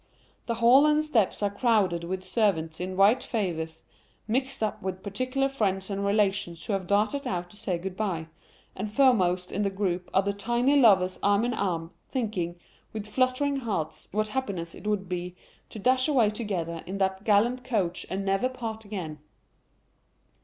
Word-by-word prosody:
The 235 - 0
hall 245 +6 +6
and 300 0 +3
steps 220 -8 +1
are 200 - +1
crowded 200 -6 +2
with 185 +2 -4
servants 165 -8 0
in 185 +1 -4
white 210 +6 +5
favours, 160 -8 -3 0.4
mixed 260 +2 -1
up 215 - -2
with 190 0 -4
particular 255 +6 -1
friends 200 -7 -1
and 200 0 -2
relations 200 -4 0
who 210 - -2
have 190 -2 -2
darted 215 +8 +1
out 175 -4 -3
to - - -14
say 190 -3 -2
good 185 +2 -6
bye; 185 -6 -2 0.5
and 205 +2 -4
foremost 185 -8 +3
in 205 - -1
the 200 - +1
group 185 -2 -2
are 190 - +3
the 200 +1 -1
tiny 240 +7 +1
lovers 195 -9 +5
arm 205 +3 +3
in 245 - 0
arm, 170 -6 -2 0.2
thinking, 205 -9 -2 0.4
with 215 -2 -4
fluttering 255 +5 +1
hearts, 160 - -3
what 215 +1 0
happiness 200 -10 -3
it - - -9
would 205 -3 0
be 180 0 -4 0.3
to - - -9
dash 255 +5 +2
away 245 -8 +3
together 180 -7 -3
in 190 +2 -4
that 190 0 0
gallant 230 +5 +3
coach, 190 -8 -1
and 195 +1 -3
never 195 +6 +1
part 225 -4 -6
again. 175 -7 -5
200 Hz, 175 wpm, -27 LUFS, 185-235 Hz, 0.5 s, hall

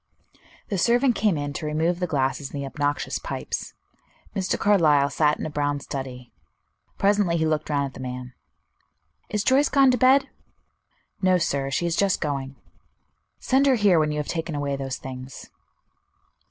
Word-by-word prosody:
The 195 - -1
servant 245 +5 +3
came 205 -7 +1
in 145 0 -3
to 155 - -5
remove 165 +3 0
the 180 - -1
glasses 135 -1 -1
and 145 - -6
the 140 - -3
obnoxious 145 +1 -2
pipes. - - -5 0.6
Mr. 190 -2 0
Carlyle 155 -9 +3
sat 150 -1 +2
in - - -5
a - - -3
brown 145 -1 -1
study; 130 -3 -7 0.7
presently 200 -4 +2
he 160 - +1
looked 155 -1 -1
round 140 -1 +1
at 135 - -7
the - - -11
man. 125 0 -6 1.0
"Is 210 -1 -1
Joyce 270 +4 +3
gone 275 -2 +5
to 250 - 0
bed?" 265 +3 +5 0.9
"No, 185 -1 +4
sir. 140 -5 -1
She 140 +5 -1
is 170 -1 0
just 200 0 +2
going." 140 -3 -3 0.8
"Send 270 +2 +2
her 265 - +5
here 205 -7 +4
when 155 -1 +1
you 150 - -3
have 150 - -3
taken 165 -2 -3
away 145 -1 -2
those 135 -1 -4
things." 130 0 -9
155 Hz, 170 wpm, -24 LUFS, 140-200 Hz, 1.0 s, gone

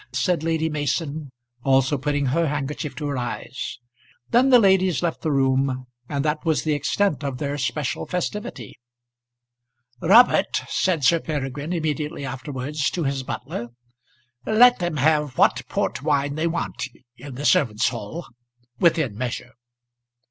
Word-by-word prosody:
said 145 +7 +1
Lady 160 0 0
Mason, 150 -1 -2 0.3
also 135 +1 +3
putting 145 +1 -1
her 160 +6 +1
handkerchief 145 0 -3
to 150 - -5
her 140 -3 -2
eyes. 120 +1 -5 0.5
Then 250 +3 +5
the 255 - +8
ladies 190 - +3
left 170 -2 -1
the 160 - -1
room, 135 -1 +1 0.2
and 140 0 -1
that 150 0 0
was 160 -2 +1
the 155 - +1
extent 150 +2 0
of 135 -3 -3
their 140 +1 -2
special 140 0 -2
festivity. 180 - -4 1.2
"Robert," 225 +9 +5
said 175 -6 0
Sir 165 +6 +5
Peregrine 145 0 -4
immediately 155 -3 -2
afterwards 135 +2 -3
to 175 - -3
his 135 -1 -1
butler, 120 -2 -5 0.8
"let 245 - +5
them 175 -4 -2
have 150 -1 +2
what - - +4
port - - -1
wine 145 -1 +1
they 155 +3 0
want 165 -3 -3 0.3
in 130 +1 -10
the 145 +3 -5
servants' 110 -9 +3
hall 120 +8 -6 0.5
within 155 -10 +2
measure." 120 +1 -4
145 Hz, 140 wpm, -23 LUFS, 135-165 Hz, 1.2 s, the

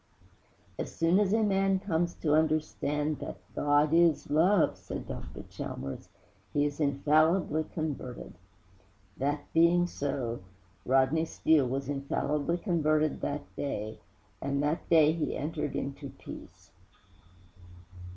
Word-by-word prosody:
'As - - -5
soon 165 +4 +3
as 200 -2 +2
a 220 +1 +3
man 195 -1 +2
comes 175 -3 -1
to 150 -2 0
understand 155 -1 0
that - - -6 0.2
GOD 145 +1 +2
IS 165 -3 +3
LOVE,' 170 +4 +4
said - - -7
Dr. - - -7
Chalmers, 70 - -7 0.4
'he 145 0 +2
is 145 0 -3
infallibly 155 +3 +2
converted.' 145 -6 -5 0.8
That 145 +2 -1
being 170 +2 +5
so, 135 -8 -3 0.5
Rodney 135 +5 +3
Steele 155 -4 +2
was 135 +1 -3
infallibly 145 +3 -1
converted 155 -5 +1
that 145 0 -2
day, 110 -6 -4 0.4
and 140 +1 -1
that 150 +3 -1
day 155 -2 +6
he 160 -1 -2
entered 150 -1 -3
into 140 0 -4
peace. - - -12
155 Hz, 120 wpm, -30 LUFS, 140-165 Hz, 0.8 s, day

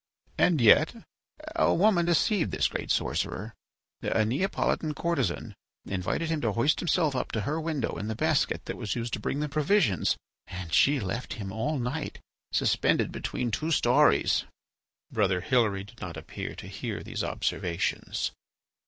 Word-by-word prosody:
And 170 -4 +4
yet 150 - +6 0.6
a 330 - +3
woman 180 -3 +3
deceived 175 +2 +2
this - - +1
great - - -5
sorcerer. 105 +4 -1 0.5
A 110 - +1
Neapolitan 150 - 0
courtesan 135 - -1 0.3
invited 95 - -2
him 160 -2 0
to 110 -3 0
hoist 140 +7 +2
himself 160 -4 +1
up 125 - -2
to 110 - 0
her 155 +9 -2
window 155 -5 -1
in 105 - -4
the 110 - -2
basket - - +1
that - - -5
was 105 - -3
used 120 0 -3
to - - -1
bring 140 +7 -2
the 150 - 0
provisions, 150 - +2 0.3
and 90 -3 -7
she 140 - +5
left 100 +5 -3
him 100 -3 -6
all 115 +9 -1
night 130 +5 -3 0.3
suspended - - +2
between 120 -2 -3
two 155 +9 -1
storeys." 160 - +4 0.7
Brother 95 -4 +1
Hilary 105 -4 +2
did 110 +4 -15
not - - -6
appear - - -6
to - - -9
hear - - -5
these - - -4
observations. 90 +1 -1
125 Hz, 155 wpm, -28 LUFS, 105-160 Hz, 0.7 s, yet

